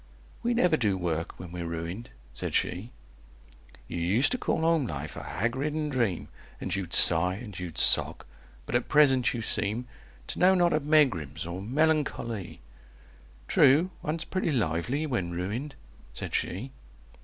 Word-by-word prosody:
"We 240 0 0
never 180 -8 +3
do 105 -7 +1
work 85 -2 -3
when 90 -2 -8
we're 85 -1 -5
ruined," 85 +7 -5 0.2
said - - -4
she. 90 +6 -1 1.0
"You 85 - -4
used 100 +11 +2
to 250 - -1
call - - -1
home 160 -5 +2
life 75 -2 -6
a - - -6
hag 115 +1 -2
ridden 150 +2 -2
dream, 115 - -1 0.3
And 95 - -2
you'd 95 -3 -4
sigh, 90 +2 +6
and 105 0 -9
you'd 90 -3 -7
sock; - - +3 0.4
but - - -7
at 120 0 0
present 135 -5 +4
you 115 - -4
seem 110 +2 0 0.4
To - - -5
know 185 +1 +5
not 175 -1 +3
of 155 -1 0
megrims 90 - +2
or 85 +2 -5
melancho 150 +4 0
ly!" 105 -6 -6 0.9
"True. 155 +8 +4
One's 160 +2 -3
pretty 185 -3 -1
lively 120 - -1
when 95 - -2
ruined," 110 +11 -4 0.4
said - - -5
she. 115 +10 -2
115 Hz, 160 wpm, -28 LUFS, -, 1.0 s, sigh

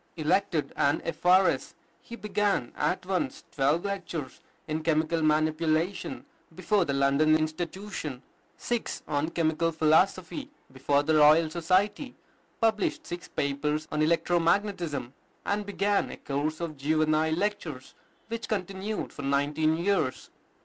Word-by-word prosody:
Elected 165 0 0
an 140 +2 +2
F.R.S., 180 +4 +2 0.3
he 235 - -9
began 205 - -1
at - - -1
once - - -2
twelve 145 +7 +1
lectures 175 -8 -4 0.3
in 155 0 -2
Chemical 160 +1 +1
Manipulation 155 +3 0 0.3
before 205 -4 +1
the 140 - -1
London 140 +3 +3
Institution, 155 -2 -4 0.3
six 240 -1 -3
on 145 +2 0
Chemical 165 0 0
Philosophy 175 - +1 0.2
before 140 +2 +1
the 160 +2 +1
Royal 155 +1 +6
Society, 190 - 0 0.4
published 220 -2 +1
six 175 0 -6
papers 150 +2 -2
on 150 - 0
electromagnetism, 170 - +1 0.3
and 205 0 -1
began 205 0 +1
a - - -8
course 145 +3 -2
of 160 -3 -4
juvenile 155 +2 +2
lectures 175 -8 -3 0.3
which 230 0 -5
continued 195 +1 -3
for - - -7
nineteen 145 +3 +1
years. 175 -7 -1
160 Hz, 120 wpm, -28 LUFS, 150-190 Hz, 0.4 s, Royal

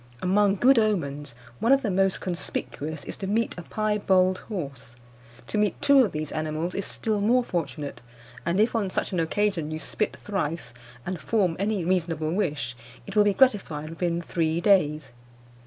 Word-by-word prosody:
Among 195 +3 +3
good 250 +4 +5
omens, 145 - -1 0.2
one 230 - +2
of 275 0 +5
the 210 - 0
most 195 0 +2
conspicuous 160 -3 -4
is - - -6
to 195 - -4
meet 225 +4 0
a 175 - -6
piebald 190 -2 +1
horse. 140 - -6 0.5
To 210 - -1
meet 210 -1 +1
two 280 -2 +6
of 210 - -1
these 155 -1 -4
animals 155 +3 -2
is 200 - -3
still 215 -2 -1
more 245 +4 +3
fortunate; 150 - -4 0.4
and 170 +4 0
if 225 +3 +3
on 205 -4 0
such - - -2
an 180 - -1
occasion 170 -1 0
you 155 - -3
spit 210 +6 -2
thrice, 170 -9 -3 0.3
and 180 -3 -4
form 190 -7 +1
any 200 -3 0
reasonable 165 -3 0
wish, 150 - -1 0.3
it - - -8
will 210 - +6
be 205 -1 +2
gratified 180 - +2
within 170 0 -1
three 165 -1 0
days. 155 - +2
185 Hz, 170 wpm, -26 LUFS, 155-210 Hz, 0.5 s, two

